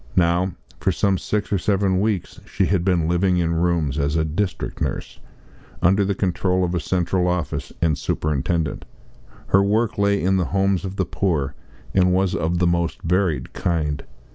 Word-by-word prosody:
Now, 90 +1 +2 0.3
for 95 - +1
some 95 +1 +1
six 105 -1 -2
or 100 - +2
seven 95 0 +1
weeks 105 -4 -2
she - - +1
had 95 -3 +1
been 90 -4 +2
living 90 +2 +2
in 85 -1 +1
rooms, 80 -3 0
as 70 +2 0
a 80 -1 +2
district 90 +5 -3
nurse, - - -3 0.6
under 95 +3 +3
the 100 0 0
control 90 -1 0
of 90 0 -1
a 90 - +1
central 90 +3 0
office 90 -4 -2
and 80 -2 +3
superintendent. 75 +2 -1 0.6
Her 95 - +5
work 105 +2 +1
lay 100 0 +3
in 95 +2 +2
the 90 - +1
homes 95 +1 +1
of 95 0 -5
the 95 - 0
poor, 75 -8 -1 0.4
and 90 -1 +4
was 95 -1 +1
of 85 +1 0
the 90 - +2
most 85 -1 0
varied 85 -7 0
kind. 75 -4 -1
90 Hz, 175 wpm, -22 LUFS, 85-95 Hz, 0.6 s, Her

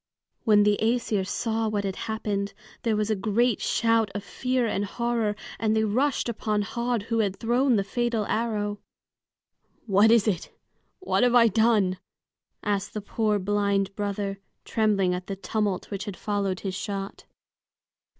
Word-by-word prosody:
When 210 -2 +6
the 205 0 +3
Æsir 220 -4 +1
saw 225 0 -1
what 205 -1 -1
had 195 -1 -2
happened, 210 -3 -3 0.3
there 225 -2 +1
was 210 +1 0
a - - +2
great 215 +3 +1
shout 225 -2 +2
of 205 - -3
fear 255 +3 -1
and 205 -2 -1
horror, 230 0 -1 0.2
and 220 -1 +1
they 220 - +2
rushed 250 +7 +1
upon 215 -2 -1
Höd, 235 +1 -2
who 230 +1 -1
had 200 -3 0
thrown 245 +2 +2
the 200 - +2
fatal 235 +1 -1
arrow. 210 -2 -1 1.1
"What 205 0 +5
is 230 -2 +5
it? 195 -5 -1 0.5
What 375 - 0
have 245 0 +4
I 230 -1 +7
done?" 210 -3 +2 0.6
asked 200 -1 -1
the 210 - -2
poor 210 +1 0
blind 200 0 0
brother, 200 -1 -3 0.3
trembling 205 -5 +2
at 180 +1 -5
the 195 - -3
tumult 205 0 -2
which 200 0 -4
had 205 -4 -6
followed 200 -3 -2
his 190 -2 -3
shot. 195 0 -5
210 Hz, 160 wpm, -26 LUFS, 200-230 Hz, 1.1 s, I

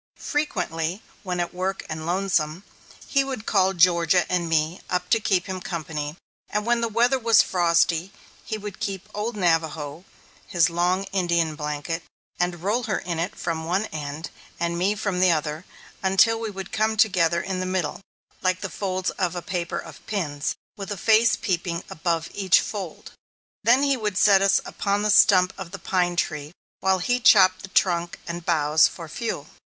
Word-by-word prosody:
Frequently, 180 - -2 0.2
when 180 -2 -3
at 175 - -2
work 190 +2 -3
and 155 +1 -5
lonesome, 175 -2 0 0.4
he 275 -1 +2
would 260 -5 -5
call 190 -2 +3
Georgia 175 -1 +4
and 175 -2 0
me 160 +2 0
up 180 0 -2
to 225 - +5
keep 190 -3 +1
him 185 -1 -5
company, 155 -3 -4 0.3
and 210 0 -2
when 240 0 +2
the 230 - +1
weather 240 +4 +2
was 230 -2 +5
frosty, 170 0 +2 0.3
he 220 - -4
would 205 -2 -8
bring 195 -1 -3
"Old 215 +3 -3
Navajo," 160 -3 0 0.4
his 175 -3 +2
long 180 +3 +1
Indian 170 -4 +1
blanket, 150 +2 -4 0.4
and 175 -1 -1
roll 225 +5 0
her 210 -4 0
in 170 -2 -4
it 180 +6 -2
from 160 -2 -3
one 185 +5 0
end, 150 +1 -6 0.3
and 170 0 -1
me 190 +4 +1
from 200 -3 -2
the 185 0 +5
other, 155 +1 -2 0.4
until 195 +4 +4
we 225 -1 -3
would 195 -2 -7
come 220 0 0
together 180 -6 +3
in 185 +1 -3
the 185 - -2
middle, 185 -3 -2 0.4
like 185 0 0
the - - -4
folds 185 -2 -2
of 180 -1 0
a 175 - -4
paper 175 -2 -3
of - - -9
pins, 155 -8 -2 0.2
with 200 0 -7
a 205 - -3
face 225 +3 +4
peeping 175 -4 -2
above 165 0 -1
each 190 -3 +4
fold. 190 -6 -6 0.5
Then 250 +4 +5
he 280 -2 +2
would 210 -4 -2
set 195 -1 +5
us 195 0 +4
upon 200 +1 -1
the 210 - +2
stump 185 -3 +5
of 190 -3 -6
the 195 - -7
pine 180 -2 0
tree 150 -2 -2 0.3
while 190 0 +2
he 245 +7 0
chopped 190 -6 +6
the 190 - -9
trunk 175 -2 +1
and 170 0 -5
boughs 155 -2 +4
for 165 -2 -9
fuel. 230 +9 -4
185 Hz, 180 wpm, -24 LUFS, 170-200 Hz, 0.5 s, chopped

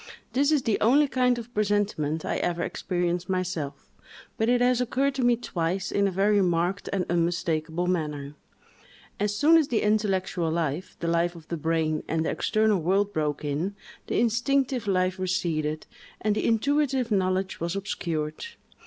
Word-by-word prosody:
This 280 +3 +3
is 295 -4 +2
the 220 - +1
only 280 +7 +5
kind 250 -2 +2
of 240 +1 -8
presentiment 200 -7 0
I - - -1
ever 175 0 -1
experienced 175 0 -2
myself; 185 -6 -3 0.4
but 225 0 0
it 245 0 +4
has 250 0 +3
occurred 270 +3 +1
to 265 -1 -2
me 240 0 +4
twice, 190 -4 -2
in 200 0 +2
a - - -1
very 200 +2 +3
marked 175 +2 0
and 190 -3 0
unmistakable 170 -1 0
manner. 150 -5 -2 0.9
As 205 0 0
soon 315 +7 +5
as 310 -4 +3
the 235 - 0
intellectual 195 -5 +1
life, 165 +2 -2
the 170 - -1
life 170 +1 +1
of 165 -2 -13
the 170 - -2
brain, 160 -1 0
and 160 0 0
the - - 0
external 215 -2 +1
world, 195 +4 +1
broke 150 -2 -1
in, 155 +8 -2 0.3
the - - 0
instinctive 245 +1 +1
life 185 -1 +1
receded, 160 -5 -1 0.3
and 215 0 +1
the - - 0
intuitive 265 +1 +1
knowledge 190 -1 0
was 170 +2 -2
obscured. 165 -6 -3
185 Hz, 165 wpm, -26 LUFS, 170-225 Hz, 0.9 s, only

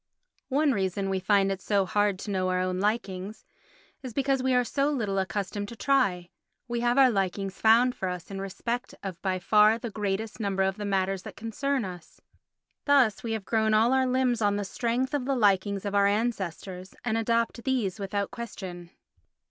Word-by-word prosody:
One 290 +2 +3
reason 195 -3 -1
why 195 - -1
we 190 - 0
find 195 0 +2
it 195 -1 -4
so 200 -1 +1
hard 205 0 +1
to 205 - -6
know 185 -1 0
our 185 0 +1
own 185 0 -1
likings 205 -1 -2 0.6
is 255 -3 -7
because 275 -1 +1
we 260 0 +2
are 250 - +4
so 275 +4 0
little 215 -9 -1
accustomed 200 +1 -3
to 235 - -8
try; 205 -10 +1 0.4
we 240 0 -2
have 240 +2 +1
our 265 -2 +6
likings 195 -1 -2
found 235 +3 +5
for 190 - -3
us 180 +1 -6
in 195 0 -5
respect 235 +5 -4
of 190 -3 -6
by 190 -1 0
far 210 +4 +4
the 235 -1 -6
greater 205 0 -1
number 195 -3 0
of 190 +1 0
the 210 - -4
matters 195 -1 0
that - - -10
concern 255 +3 -2
us; 180 -3 -10 0.7
thus 270 -8 +4
we 230 -1 -3
have 220 -3 -4
grown 220 0 +2
all 230 +4 +4
our 260 -1 +3
limbs 250 -2 +1
on 205 -1 +2
the 205 - -1
strength 245 +7 -1
of 280 -4 -1
the 275 0 0
likings 200 -3 +2
of 200 - -2
our 200 0 +4
ancestors 195 -4 -3
and 220 -2 0
adopt 230 +1 0
these 235 -8 -1
without 200 0 -2
question. 185 -7 -7
205 Hz, 195 wpm, -27 LUFS, 195-240 Hz, 0.7 s, our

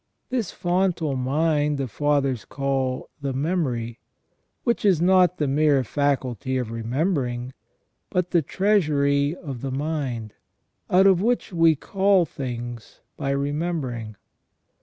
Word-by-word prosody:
This 240 -7 -1
fontal 175 -5 0
mind 145 +3 +1
the 135 -1 -2
Fathers 140 -2 0
call 135 0 -2
the 140 -1 -2
memory, 130 -6 -1 0.6
which 235 -1 0
is 190 -6 +4
not 180 0 +4
the 150 - 0
mere 145 -1 +3
faculty 130 -1 -1
of 125 -3 -3
remembering, 125 +1 -1 0.6
but 180 -1 -1
the 170 - +4
treasury 150 -6 +2
of 135 -9 -7
the 135 - -3
mind, 135 -6 -3 0.6
out 185 +2 +5
of 190 -2 +5
which 235 -2 0
we 165 -2 +5
call 195 +3 +2
things 120 -5 -7
by 135 - -3
remembering. 140 -6 -2
145 Hz, 120 wpm, -24 LUFS, 130-175 Hz, 0.6 s, out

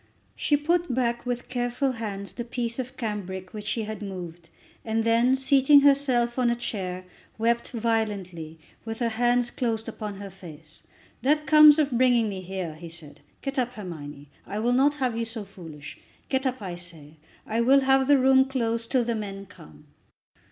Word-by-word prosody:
She 295 - +2
put 340 +1 0
back 240 -1 -1
with 245 -1 -3
careful 245 +2 -1
hands 205 -5 -6
the 240 - -5
piece 235 0 -4
of 255 +1 -5
cambric 190 -4 -5
which 210 -1 -7
she 220 +2 -1
had 215 -1 -6
moved, 175 -4 -7 0.3
and 225 0 0
then, 235 +3 +3
seating 275 +1 +5
herself 265 -4 +3
on 245 -1 +3
a 235 - +1
chair, 185 -6 -4 0.3
wept 235 +1 +1
violently, 205 -9 -2 0.3
with 225 0 -5
her 235 -1 0
hands 240 +1 +1
closed 225 -2 -2
upon 215 -2 -5
her 200 0 -8
face. 160 -4 -13 0.4
"That 300 +3 +2
comes 305 -1 +8
of 295 -3 +2
bringing 240 -2 +3
me 190 -2 -5
here," 185 -3 -5
he 165 +2 -10
said. 160 -3 -12 0.2
"Get 275 0 -2
up, 250 0 -1
Hermione. 145 - -9 0.2
I 205 - -4
will 235 +3 +1
not 280 +3 +3
have 255 -5 -1
you 230 - -1
so 225 -1 -5
foolish. 160 -7 -11 0.3
Get 265 0 +1
up, 255 -4 -3
I 185 -2 -4
say. 160 -4 -10 0.3
I 225 +2 0
will 270 +4 +5
have 265 0 +3
the 285 -1 +6
room 265 0 +5
closed 230 -3 -2
till 255 -3 +2
the 235 0 -1
men 200 -3 -5
come." 75 - -16
230 Hz, 180 wpm, -26 LUFS, 195-255 Hz, 0.4 s, comes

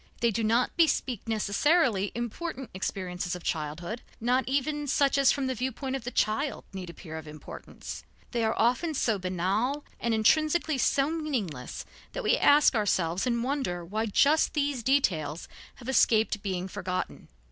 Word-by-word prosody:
They 235 -1 +3
do 225 +2 -1
not 230 +3 +2
bespeak 275 - +2
necessarily 220 - +2
important 250 +2 -4
experiences 180 -1 -3
of 180 - -9
childhood, 165 +8 -3 0.2
not 250 +3 +1
even 290 +2 -1
such 280 0 +3
as 275 -2 +5
from 275 - -1
the 260 - 0
viewpoint 260 +2 -3
of 260 -3 -5
the - - -2
child 250 +5 0
need 185 -2 -6
appear 160 -1 -8
of 155 - -11
importance. 150 0 -9 0.3
They 235 -2 0
are 220 0 0
often 250 +8 +2
so 225 -6 +1
banal 195 +10 -1
and 235 - -1
intrinsically 310 +6 +2
so 275 +4 +2
meaningless 240 - -3 0.3
that - - -4
we - - +4
ask 290 0 +5
ourselves 190 -3 +1
in 235 -1 0
wonder 255 -11 -2
why 215 +5 -2
just 290 +10 +3
these 285 -4 0
details 175 - +1 0.3
have 245 - -12
escaped 220 -5 +3
being 185 -2 -2
forgotten. 185 -2 -4
235 Hz, 160 wpm, -28 LUFS, 190-275 Hz, 0.3 s, as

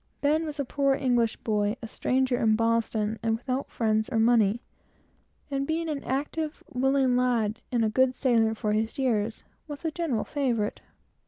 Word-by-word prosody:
Ben 310 +3 +2
was 300 -1 -6
a 280 - 0
poor 275 +1 +1
English 240 -4 +1
boy, 210 -1 0
a - - -4
stranger 255 +2 0
in 220 -1 +3
Boston, 225 -1 0
and 225 -1 +1
without 255 +3 -3
friends 220 -1 0
or - - -1
money; 225 -1 +3 0.9
and 275 0 -1
being 325 +1 -1
an 295 -3 -3
active, 295 +3 -3
willing 265 0 +2
lad, 235 -3 +1
and 235 -3 +2
a - - +2
good 260 +3 +2
sailor 225 -5 +2
for 215 -1 -1
his 220 +1 -1
years, 225 -5 0 0.2
was 290 +2 -8
a 320 - 0
general 310 -9 -1
favorite. 240 -8 -1
245 Hz, 170 wpm, -27 LUFS, 220-275 Hz, 0.9 s, in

